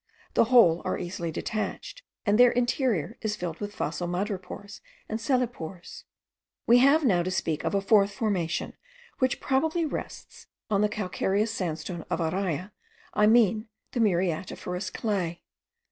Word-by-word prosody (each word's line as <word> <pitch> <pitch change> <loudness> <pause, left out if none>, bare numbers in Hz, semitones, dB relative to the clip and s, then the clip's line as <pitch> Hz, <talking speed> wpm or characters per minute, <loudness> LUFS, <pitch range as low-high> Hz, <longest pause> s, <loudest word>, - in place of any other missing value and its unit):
The - - +4
whole 225 -9 +5
are 185 - -1
easily 175 -1 -4
detached, 215 - -4 0.2
and 210 +1 +3
their 245 0 +8
interior 240 - 0
is 215 -2 -1
filled 170 -2 -5
with 205 0 -5
fossil 165 0 -2
madrepores 195 +2 -4 0.3
and 220 - -3
cellepores. 225 - -3 0.6
We 240 +1 +6
have 280 +4 +5
now 185 -8 +4
to 180 - -2
speak 165 -4 -1
of - - -1
a 195 - +2
fourth 200 0 +4
formation, 195 -6 -1 0.5
which 260 -2 +1
probably 320 +5 +1
rests* 300 - -7 0.2
on 200 -1 +3
the 210 - +3
calcareous 210 +1 -1
sandstone 170 -2 -4
of 175 - 0
Araya, 180 +1 -2 0.4
I 210 0 +4
mean 220 -1 +4 0.2
the 245 - -3
muriatiferous 180 -1 -1
clay. 185 -7 -2
205 Hz, 145 wpm, -27 LUFS, 175-230 Hz, 0.6 s, their